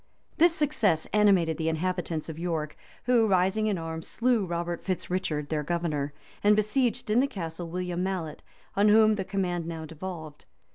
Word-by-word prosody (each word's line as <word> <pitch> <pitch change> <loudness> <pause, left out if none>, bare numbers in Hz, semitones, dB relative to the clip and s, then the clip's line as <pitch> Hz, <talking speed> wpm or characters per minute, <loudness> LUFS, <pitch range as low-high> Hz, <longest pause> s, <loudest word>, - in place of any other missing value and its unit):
[] - - -36
This 335 +1 +5
success 225 - +1
animated 195 -6 +4
the 160 -1 0
inhabitants 165 -1 -2
of 160 -1 -7
York, 160 -3 -2 0.3
who, 240 -2 +4
rising 190 +3 +2
in 205 -3 0
arms, 165 -1 -5
slew 235 -5 +1
Robert 170 0 -3
Fitz 180 -2 -3
Richard, 155 -6 -2
their 155 -1 0
governor,[] 150 -3 -2 0.3
and 210 +1 +6
besieged 240 +2 0
in 225 - +4
the 270 - +3
castle 170 -6 -6
William 180 0 -3
Mallet, 180 -5 -3 0.3
on 200 +2 +4
whom 215 0 +6
the 200 -2 -2
command 180 -3 -2
now 165 -1 -5
devolved. 160 -1 -8
180 Hz, 175 wpm, -28 LUFS, 165-210 Hz, 0.3 s, and